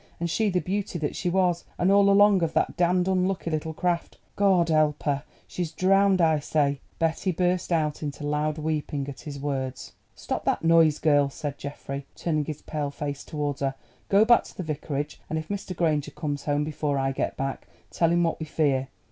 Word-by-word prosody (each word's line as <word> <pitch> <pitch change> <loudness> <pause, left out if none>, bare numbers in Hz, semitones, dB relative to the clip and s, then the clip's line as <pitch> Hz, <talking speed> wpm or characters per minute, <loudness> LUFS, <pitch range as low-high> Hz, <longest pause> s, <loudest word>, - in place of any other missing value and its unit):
and 170 0 -2
she 220 +3 +1
the 180 -1 +1
beauty 195 0 -2
that 155 -3 -2
she 180 - -1
was; 180 -1 +1
and 180 +2 +3
all 200 0 +5
along 200 -1 +6
of 165 -1 0
that - - +1
damned 180 +1 +2
unlucky 185 -2 0
little 155 +1 -2
craft. 175 +1 -2 0.2
Goad 190 -4 +3
help 155 -2 +2
her! 140 -2 0 0.2
She's 175 -3 -4
drowned, 195 +2 +3
I 160 -3 +4
say——" 145 -1 0 0.2
Betty 165 +3 0
burst 180 +1 0
out 155 -3 0
into 145 -1 -5
loud 150 +1 0
weeping 150 -2 -2
at 140 - -7
his 145 -3 -7
words. 135 -2 -3 0.2
"Stop - - -4
that - - +1
noise, 165 -2 +5
girl," 145 -3 +3
said 145 0 -6
Geoffrey, 140 -1 -6
turning 155 -3 -1
his 150 -1 -6
pale 150 -2 -3
face 145 0 -5
towards 145 -2 -3
her. 135 -1 0 0.3
"Go 200 +2 +5
back 240 0 +5
to - - -14
the 185 - -3
Vicarage, 150 -1 -4
and 160 - -1
if 155 0 -5
Mr. 200 -2 -4
Granger 155 -4 +1
comes 145 -3 -4
home 145 0 +1
before 150 -1 -2
I 135 0 +1
get 135 - -2
back, 135 0 -4 0.2
tell 165 -1 +2
him 175 0 +3
what 165 - 0
we 160 - -5
fear. 140 -4 +1
155 Hz, 200 wpm, -26 LUFS, 145-180 Hz, 0.3 s, along